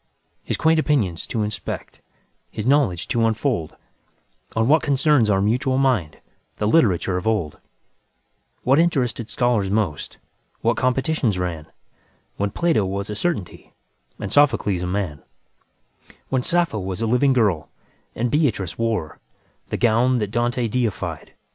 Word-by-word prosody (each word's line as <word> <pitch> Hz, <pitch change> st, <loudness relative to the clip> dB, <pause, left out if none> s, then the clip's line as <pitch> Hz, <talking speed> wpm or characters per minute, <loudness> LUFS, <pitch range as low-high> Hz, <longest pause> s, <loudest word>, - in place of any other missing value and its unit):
His -, -, -2 dB
quaint 160 Hz, 0 st, +3 dB
opinions 115 Hz, -, 0 dB
to 110 Hz, -3 st, -1 dB
inspect, 105 Hz, 0 st, -6 dB, 0.5 s
His 105 Hz, -, -5 dB
knowledge 130 Hz, -, +2 dB
to 120 Hz, -, 0 dB
unfoldOn 110 Hz, -, -1 dB, 0.8 s
what 130 Hz, +8 st, +4 dB
concerns 140 Hz, -4 st, +3 dB
our 95 Hz, -1 st, +3 dB
mutual 130 Hz, +5 st, +1 dB
mind, 120 Hz, -, +1 dB, 0.4 s
The 105 Hz, -, -2 dB
literature 95 Hz, -, +2 dB
of 90 Hz, -, -4 dB
old; 95 Hz, -10 st, -1 dB, 1.0 s
What 135 Hz, +4 st, +4 dB
interested 130 Hz, -9 st, 0 dB
scholars 120 Hz, -6 st, +1 dB
most, 100 Hz, -8 st, -2 dB, 0.4 s
What 115 Hz, +1 st, +2 dB
competitions 130 Hz, -, 0 dB
ranWhen 90 Hz, +3 st, -7 dB
Plato 165 Hz, -7 st, +1 dB
was 100 Hz, +2 st, -3 dB
a -, -, -4 dB
certainty, 110 Hz, -, -3 dB, 0.5 s
And 100 Hz, -, -5 dB
Sophocles 130 Hz, -10 st, +3 dB
a 90 Hz, -, -2 dB
man; 90 Hz, -7 st, -3 dB, 1.1 s
When 130 Hz, -1 st, +1 dB
Sappho 170 Hz, -6 st, 0 dB
was 95 Hz, +3 st, -4 dB
a -, -, +2 dB
living 125 Hz, +4 st, +3 dB
girl, 100 Hz, -, +1 dB, 0.5 s
And 120 Hz, +1 st, -1 dB
Beatrice 120 Hz, -, +1 dB
woreThe 110 Hz, -9 st, -5 dB
gown 120 Hz, +2 st, +3 dB
that 105 Hz, -3 st, -2 dB
Dante 120 Hz, +1 st, 0 dB
deified. 115 Hz, -2 st, -3 dB
115 Hz, 130 wpm, -22 LUFS, 100-130 Hz, 1.1 s, what